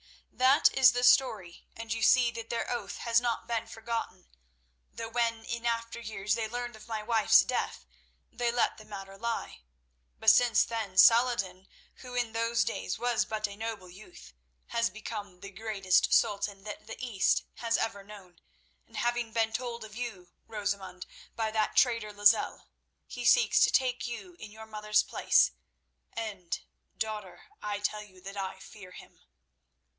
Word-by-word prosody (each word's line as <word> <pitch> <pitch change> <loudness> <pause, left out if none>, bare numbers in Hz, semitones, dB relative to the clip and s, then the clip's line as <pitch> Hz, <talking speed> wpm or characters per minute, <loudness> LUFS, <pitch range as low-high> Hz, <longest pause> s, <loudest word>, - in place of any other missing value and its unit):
"That 260 +3 +4
is 260 -3 +7
the 245 0 -1
story, 220 -9 +3
and 225 -1 -4
you 225 - -4
see 240 +1 +5
that 230 0 -8
their 235 - -2
oath 240 - -4
has 230 0 +2
not 235 -2 -1
been 230 -1 -2
forgotten, 225 - -5 0.6
though 230 - -6
when 230 -1 -1
in 235 0 -3
after 230 0 -2
years 210 -3 -2
they 225 0 -1
learned 240 +1 -5
of 220 - -14
my 220 -2 -4
wife's 225 0 +5
death, 250 - -3 0.5
they 240 0 -1
let 240 -2 0
the 215 - -13
matter 195 -2 -9
lie. 230 - -4 0.6
But 220 - +6
since 240 +1 +4
then 220 -5 -5
Saladin, 215 -5 +4 0.3
who 250 -1 -10
in 240 -2 0
those 230 +1 +1
days 95 0 -3
was 245 -1 +1
but 215 -1 -2
a 200 - -9
noble 215 -4 -6
youth, 180 - -14 0.4
has 230 0 +1
become 205 -3 -8
the 200 - -8
greatest 195 -2 +1
sultan 200 -1 +1
that 215 +1 -8
the 225 - -7
East 235 -6 +1
has 230 -1 0
ever 200 -3 -3
known, 195 -4 -14 0.5
and - - -12
having 240 -1 -1
been 225 -1 +1
told 235 -1 -4
of 215 -1 -11
you, 205 -8 -6 0.2
Rosamund, 200 -4 -4 0.3
by 220 -1 -1
that 215 -1 0
traitor 230 -4 +3
Lozelle, 205 +1 +3 0.4
he - - -7
seeks - - +5
to - - +6
take 250 -2 +1
you 345 +10 -7
in 215 - -9
your 220 +1 -11
mother's 215 -1 +1
place, - - +3 0.6
and, 200 -6 -4 0.4
daughter, 210 -5 -5 0.2
I 205 -1 -3
tell 210 +1 -2
you 190 -3 -15
that 195 +2 -8
I 190 -1 -4
fear 190 -1 -13
him." - - -14
220 Hz, 165 wpm, -30 LUFS, 205-235 Hz, 0.6 s, is